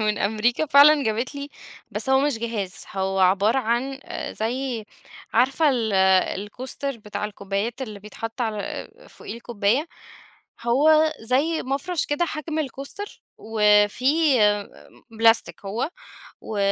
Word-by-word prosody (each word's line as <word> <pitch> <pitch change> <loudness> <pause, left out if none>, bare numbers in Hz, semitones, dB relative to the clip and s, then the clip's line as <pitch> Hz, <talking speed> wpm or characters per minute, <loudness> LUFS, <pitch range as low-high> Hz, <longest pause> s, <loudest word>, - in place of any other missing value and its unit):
من 210 -1 0
أمريكا 220 +8 +1
فعلًا 290 +1 +7
جابت 225 +6 -1
لي، 280 0 -6 0.4
بس 215 +4 -2
هو 265 0 +5
مش 285 -4 0
جهاز، 220 -5 -3
هو 190 0 -1
عبارة 200 +6 +3
عن 260 +3 -1
آآ - - -5
زي 240 0 -3 0.5
عارفة 270 +6 +3
ال 230 -5 -1 0.5
الكوستر 255 +5 -5
بتاع 210 -1 -5
الكوبايات 210 +4 -3
اللي 215 -5 -7
بيتحط 225 +3 -7
على 220 -3 -1
آآ - - -8
فوقيه - - -9
الكوباية، 235 +4 0 0.8
هو 310 +6 +4
زي 270 +8 +1
مَفرش 280 +6 -2
كده، 290 +4 0
حجم 315 -1 -4
الكوستر 285 - -6 0.2
وفي 210 +1 +3 0.4
آآ 205 0 +3
آمم - - -18 0.2
بلاستيك 225 -2 +3
هو 225 +10 -2 0.5
و 215 - -6
235 Hz, 135 wpm, -23 LUFS, 210-275 Hz, 0.8 s, فعلًا